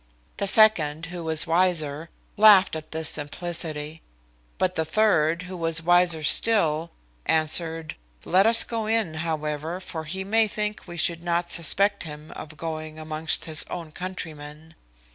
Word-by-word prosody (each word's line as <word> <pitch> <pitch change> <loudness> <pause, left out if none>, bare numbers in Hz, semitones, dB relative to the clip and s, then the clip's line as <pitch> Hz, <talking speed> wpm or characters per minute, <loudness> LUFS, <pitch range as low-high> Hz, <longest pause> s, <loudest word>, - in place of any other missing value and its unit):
The 200 - -2
second, 165 -8 +4
who 175 -1 -6
was 160 -1 +1
wiser, 165 -3 0 0.3
laughed 205 -4 +6
at 155 0 -8
this 160 0 -2
simplicity; 155 0 -1 0.6
but 185 0 0
the 160 - -1
third, 170 -3 +1
who 185 +1 -8
was 165 -1 0
wiser 175 -2 +2
still, 165 -3 +2 0.4
answered, 160 0 +1 0.3
"Let 190 +4 +3
us 230 0 +7
go 225 -2 -4
in, 220 -7 0
however, 155 +1 -4
for 160 -4 -7
he 190 +5 -4
may 220 +3 +2
think 210 -1 -4
we 175 0 -9
should 170 0 0
not 170 0 -2
suspect 200 +5 +2
him 150 -1 -9
of 155 0 -10
going 155 -1 -6
amongst 155 0 -3
his 155 -2 +1
own 165 -3 -7
countrymen." 160 -3 -9
165 Hz, 145 wpm, -24 LUFS, 155-185 Hz, 0.6 s, us